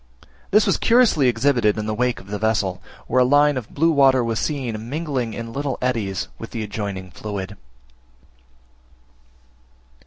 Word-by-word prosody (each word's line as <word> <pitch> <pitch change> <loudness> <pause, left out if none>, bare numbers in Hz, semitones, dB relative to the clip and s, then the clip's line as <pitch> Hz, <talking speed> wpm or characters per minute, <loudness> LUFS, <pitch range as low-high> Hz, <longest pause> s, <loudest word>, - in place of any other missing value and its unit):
This 210 +2 +4
was - - +2
curiously 230 - +4
exhibited 120 -3 +2
in 105 - -3
the 110 - -2
wake 125 +2 0
of - - -14
the 105 +1 -5
vessel, 105 -4 0 0.2
where 130 - +2
a - - +6
line 145 +3 +4
of 125 -4 -5
blue 165 +3 +3
water 135 -4 +4
was 115 -1 -1
seen 120 -7 -3
mingling 140 -7 -3
in 115 0 -6
little 140 -2 -2
eddies, 115 -7 -2
with - - -7
the 115 - -4
adjoining 100 -3 -5
fluid. 100 0 -6
120 Hz, 155 wpm, -22 LUFS, 105-140 Hz, 0.2 s, a